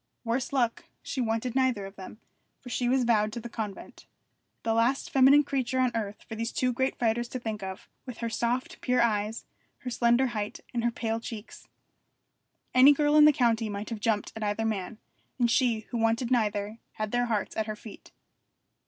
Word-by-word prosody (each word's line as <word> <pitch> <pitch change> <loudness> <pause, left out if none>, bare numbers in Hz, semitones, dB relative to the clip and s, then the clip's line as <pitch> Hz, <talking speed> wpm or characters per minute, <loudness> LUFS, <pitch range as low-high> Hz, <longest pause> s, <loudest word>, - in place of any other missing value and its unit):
Worse 240 +2 -1
luck, 245 -4 0 0.2
she 265 - -3
wanted 225 +1 -1
neither 255 -6 +1
of 195 +1 -10
them, 195 +3 -10 0.4
for 250 - -11
she 245 0 0
was 260 0 +3
vowed 215 -3 +2
to 235 - -4
the 235 - -7
convent: 210 -3 -7 0.6
the 225 - +1
last 235 +4 +1
feminine 275 +2 +6
creature 260 -2 -1
on 255 -1 +3
earth 210 -2 -4
for - - -7
these 230 +1 -3
two 250 -1 0
great 260 +2 -1
fighters 235 0 0
to 255 - -5
think 220 -3 -4
of, 190 -1 -7 0.2
with 250 - -7
her 235 - -3
soft, 235 +2 -2
pure 250 0 +1
eyes, 215 -1 0 0.4
her 250 - -5
slender 240 +2 +3
height, 210 -2 -3
and 235 -1 -1
her 240 - +3
pale 225 -1 -2
cheeks. 225 -2 -9 1.1
Any 260 +3 +8
girl 295 +1 +2
in 300 0 +8
the 300 - +8
country 230 -5 +1
might 205 +2 -5
have 225 - -4
jumped 210 -1 0
at 220 - -7
either 210 +1 -1
man, 215 -1 -3 0.4
and 240 -2 +2
she, 240 -4 +2
who 240 - -2
wanted 230 +2 +1
neither, 210 -2 0
had 215 -1 -4
their 245 0 +1
hearts 215 -4 -2
at 220 0 -1
her 215 - -3
feet. 210 0 -13
230 Hz, 195 wpm, -28 LUFS, 215-250 Hz, 1.1 s, Any